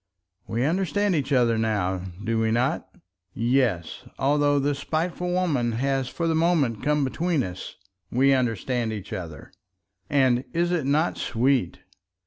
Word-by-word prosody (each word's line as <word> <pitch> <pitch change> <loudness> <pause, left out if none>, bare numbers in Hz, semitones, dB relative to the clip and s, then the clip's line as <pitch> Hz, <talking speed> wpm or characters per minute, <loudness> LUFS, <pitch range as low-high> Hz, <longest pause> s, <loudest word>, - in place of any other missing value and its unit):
"We 115 +3 -1
understand 190 +4 +1
each 145 -3 -1
other 120 -4 +3
now, 95 -5 0 0.2
do 115 +1 0
we 110 0 +1
not? 120 +4 0 0.5
Yes; 115 -7 0 0.2
although 145 +1 +2
this 140 0 0
spiteful 175 +3 -2
woman 150 -11 +1
has 135 +2 0
for 170 - -3
the 165 - +2
moment 160 -9 +1
come 150 +1 +1
between 160 +2 0
us, 90 -2 -7 0.3
we 135 +3 +3
understand 120 -1 0
each 105 -2 -6
other. 80 -6 -7 0.6
And 130 -3 +3
is 175 +1 +1
it 165 -6 0
not 155 +4 +1
sweet? 125 -4 0
135 Hz, 140 wpm, -25 LUFS, 115-155 Hz, 0.6 s, other